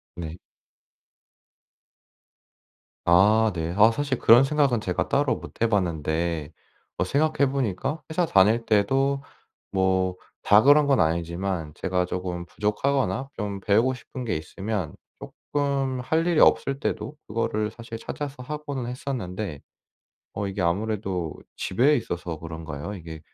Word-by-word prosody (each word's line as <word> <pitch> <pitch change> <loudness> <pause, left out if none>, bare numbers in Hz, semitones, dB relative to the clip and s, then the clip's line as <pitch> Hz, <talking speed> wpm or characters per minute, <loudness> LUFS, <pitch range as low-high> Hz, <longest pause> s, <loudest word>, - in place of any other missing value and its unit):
네. 85 -1 -6 2.7
아 105 +6 +5
네. 80 -1 -3
아 110 +2 +7
사실 140 0 -1
그런 120 +4 +7
생각은 135 -5 +2
제가 90 -3 -2
따로 - - +2
못 - - -11
해 115 - +3
봤는데 80 -4 -1 0.5
어 - - +1
생각해 140 +5 +1
보니까 135 - -2
회사 170 +2 +1
다닐 110 - +4
때도 135 +7 +2 0.5
뭐 95 -1 +1 0.3
다 105 +1 +6
그런 145 +3 +6
건 135 -2 +3
아니지만 85 +1 -1
제가 90 -1 0
조금 90 -1 -4
부족하거나 130 +7 -1
좀 100 -2 -4
배우고 115 +7 +3
싶은 125 0 -8
게 110 - -1
있으면 95 +1 -4 0.2
쪼끔 140 -3 -2
할 160 +6 +1
일이 170 -3 +2
없을 135 0 +4
때도 150 - -3
그거를 105 -1 -1
사실 115 0 -8
찾아서 140 +2 -6
하고는 145 -3 -4
했었는데, 105 - -4 0.7
어 100 - -2
이게 95 0 -3
아무래도 95 -2 -1 0.2
집에 135 +10 +3
있어서 85 -7 -4
그런가요? 80 +2 -6
이게 80 -4 -8
105 Hz, 265 characters per minute, -25 LUFS, 90-135 Hz, 2.7 s, 아